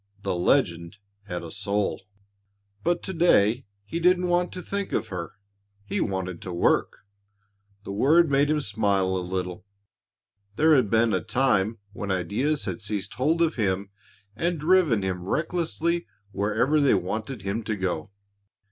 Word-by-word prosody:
The -, -, 0 dB
legend 85 Hz, -2 st, +1 dB, 0.3 s
had 90 Hz, -4 st, -5 dB
a 80 Hz, -, -8 dB
soul. 100 Hz, +1 st, -1 dB, 0.8 s
But 175 Hz, 0 st, 0 dB
to 190 Hz, -, -4 dB
day 125 Hz, -, +3 dB, 0.2 s
he 165 Hz, +11 st, -3 dB
didn't 180 Hz, +1 st, +3 dB
want 175 Hz, 0 st, +1 dB
to 180 Hz, -, -6 dB
think 200 Hz, -1 st, -3 dB
of -, -, -1 dB
her. 85 Hz, -3 st, -5 dB, 0.5 s
He -, -, -2 dB
wanted 90 Hz, -2 st, -3 dB
to 90 Hz, -, -6 dB
work. 85 Hz, +3 st, +1 dB, 0.8 s
The 100 Hz, -, -6 dB
word 150 Hz, +10 st, +4 dB
made 140 Hz, +1 st, +3 dB
him 155 Hz, -1 st, +2 dB
smile 100 Hz, -4 st, +1 dB
a -, -, 0 dB
little. 90 Hz, +1 st, -4 dB, 0.9 s
There 155 Hz, +5 st, +5 dB
had 130 Hz, -8 st, +4 dB
been 115 Hz, +1 st, +3 dB
a -, -, +1 dB
time 110 Hz, -2 st, +1 dB, 0.2 s
when 100 Hz, -2 st, -5 dB
ideas 105 Hz, -, 0 dB
had -, -, -4 dB
seized 100 Hz, -1 st, -4 dB
hold 160 Hz, +6 st, +2 dB
of 165 Hz, -3 st, 0 dB
him 100 Hz, -2 st, -1 dB, 0.4 s
and 170 Hz, +6 st, -1 dB
driven 155 Hz, -, +3 dB
him 95 Hz, -2 st, -2 dB
recklessly 170 Hz, -, -1 dB, 0.2 s
wherever 110 Hz, +10 st, +1 dB
they 140 Hz, -6 st, +4 dB
wanted 105 Hz, +5 st, -3 dB
him 100 Hz, +4 st, -2 dB
to 110 Hz, -, -1 dB
go. 95 Hz, -4 st, -2 dB
110 Hz, 155 wpm, -26 LUFS, 95-155 Hz, 0.9 s, There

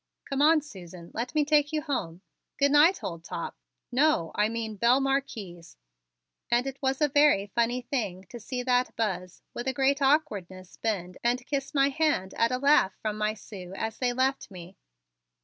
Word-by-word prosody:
"Come 275 Hz, 0 st, -2 dB
on, 310 Hz, +1 st, +5 dB
Susan, 180 Hz, -, -12 dB
let 245 Hz, +6 st, -4 dB
me 300 Hz, -1 st, +3 dB
take 295 Hz, 0 st, +3 dB
you 305 Hz, -1 st, -1 dB
home. 185 Hz, -, -3 dB, 0.4 s
Good 280 Hz, 0 st, +3 dB
night, 310 Hz, +6 st, +5 dB
old 170 Hz, -2 st, -5 dB
top -, -, -5 dB, 0.4 s
no, 255 Hz, -, +2 dB
I 210 Hz, +1 st, +1 dB
mean 225 Hz, -1 st, -4 dB
belle 235 Hz, +5 st, +4 dB
Marquise" 230 Hz, -11 st, -3 dB, 0.7 s
and 240 Hz, +1 st, +2 dB
it 270 Hz, 0 st, -6 dB
was 265 Hz, +1 st, 0 dB
a 300 Hz, -, +5 dB
very 290 Hz, -7 st, +4 dB
funny 235 Hz, +2 st, +1 dB
thing 210 Hz, -8 st, -3 dB
to 240 Hz, -, -8 dB
see 250 Hz, +3 st, -4 dB
that 250 Hz, 0 st, +1 dB
Buzz 185 Hz, -5 st, -3 dB
with 240 Hz, -, -5 dB
a 265 Hz, -, +1 dB
great 275 Hz, +2 st, +1 dB
awkwardness, 205 Hz, -, 0 dB
bend 180 Hz, -5 st, -3 dB
and 245 Hz, +1 st, 0 dB
kiss 275 Hz, +1 st, -3 dB
my 275 Hz, 0 st, +4 dB
hand 280 Hz, -10 st, 0 dB
at 230 Hz, +1 st, +1 dB
a 255 Hz, -, +1 dB
laugh 280 Hz, -8 st, +3 dB
from 215 Hz, -1 st, -3 dB
my 215 Hz, 0 st, -1 dB
Sue 190 Hz, -3 st, -10 dB
as 220 Hz, +2 st, -4 dB
they 250 Hz, -1 st, +1 dB
left 260 Hz, +2 st, 0 dB
me. 180 Hz, -1 st, -11 dB
245 Hz, 185 wpm, -27 LUFS, 195-275 Hz, 0.7 s, on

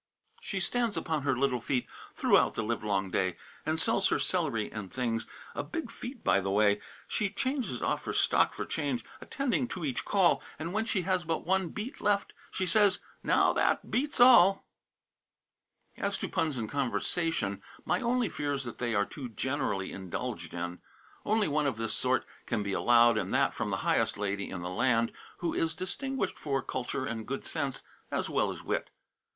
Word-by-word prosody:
She 195 Hz, -, -3 dB
stands 235 Hz, +4 st, 0 dB
upon 160 Hz, -3 st, -1 dB
her 130 Hz, -2 st, +1 dB
little 130 Hz, -2 st, +1 dB
feet 125 Hz, +1 st, 0 dB, 0.3 s
Throughout -, -, +4 dB
the 115 Hz, -, -1 dB
livelong 105 Hz, -4 st, -1 dB
day, 95 Hz, -2 st, 0 dB, 0.3 s
And 160 Hz, +1 st, +1 dB
sells 195 Hz, +1 st, +3 dB
her -, -, +2 dB
celery 145 Hz, -, 0 dB
and 105 Hz, -4 st, -6 dB
things 115 Hz, -3 st, -1 dB, 0.3 s
A -, -, -2 dB
big 330 Hz, -1 st, -5 dB
feat, 245 Hz, 0 st, -8 dB
by 100 Hz, -, +4 dB
the 95 Hz, 0 st, -2 dB
way. 105 Hz, +1 st, +3 dB, 0.3 s
She 205 Hz, -, 0 dB
changes 245 Hz, -, -2 dB
off -, -, 0 dB
her -, -, -1 dB
stock -, -, +3 dB
for -, -, -3 dB
change, 130 Hz, -6 st, -2 dB, 0.2 s
Attending 260 Hz, -2 st, 0 dB
to 180 Hz, -8 st, -4 dB
each 135 Hz, -4 st, -1 dB
call; 195 Hz, -4 st, +3 dB, 0.2 s
And 165 Hz, +3 st, -4 dB
when 220 Hz, +2 st, +1 dB
she 195 Hz, -5 st, 0 dB
has 185 Hz, 0 st, +1 dB
but 165 Hz, -1 st, -2 dB
one 190 Hz, -1 st, +1 dB
beet 215 Hz, -, -6 dB
left, 200 Hz, -1 st, +1 dB, 0.2 s
She 190 Hz, -, -2 dB
says, 195 Hz, +1 st, +4 dB, 0.2 s
"Now, -, -, +4 dB
that -, -, +1 dB
beats 285 Hz, +3 st, 0 dB
all." 235 Hz, -6 st, +7 dB, 1.3 s
As -, -, -1 dB
to -, -, -3 dB
puns 160 Hz, -6 st, 0 dB
in 110 Hz, -2 st, -2 dB
conversation, 135 Hz, -, -1 dB, 0.2 s
my -, -, +1 dB
only 245 Hz, -1 st, +2 dB
fear 145 Hz, -5 st, -2 dB
is 135 Hz, -1 st, -2 dB
that 120 Hz, -2 st, -7 dB
they 120 Hz, -2 st, 0 dB
are 100 Hz, 0 st, +3 dB
too 130 Hz, +1 st, -7 dB
generally 125 Hz, -5 st, -1 dB
indulged 95 Hz, -2 st, -5 dB
in. 90 Hz, +1 st, -4 dB, 0.5 s
Only 215 Hz, 0 st, +3 dB
one 150 Hz, -1 st, +1 dB
of 130 Hz, -5 st, -1 dB
this 115 Hz, -1 st, -1 dB
sort -, -, +1 dB, 0.2 s
can 105 Hz, -, 0 dB
be 100 Hz, -1 st, -2 dB
allowed, 120 Hz, +1 st, +5 dB
and -, -, -3 dB
that -, -, +3 dB
from -, -, -2 dB
the -, -, 0 dB
highest -, -, +2 dB
lady 100 Hz, 0 st, -2 dB
in 90 Hz, -2 st, -5 dB
the 90 Hz, -, -3 dB
land, 115 Hz, +3 st, +2 dB, 0.3 s
who 170 Hz, -, 0 dB
is 160 Hz, -1 st, 0 dB
distinguished 230 Hz, +4 st, -2 dB
for 135 Hz, -2 st, -1 dB
culture 130 Hz, +1 st, -3 dB
and 115 Hz, -3 st, -4 dB
good 135 Hz, +1 st, -4 dB
sense, 140 Hz, -5 st, -2 dB, 0.3 s
as -, -, -2 dB
well -, -, +2 dB
as -, -, -6 dB
wit. -, -, -1 dB
140 Hz, 190 wpm, -30 LUFS, -, 1.3 s, all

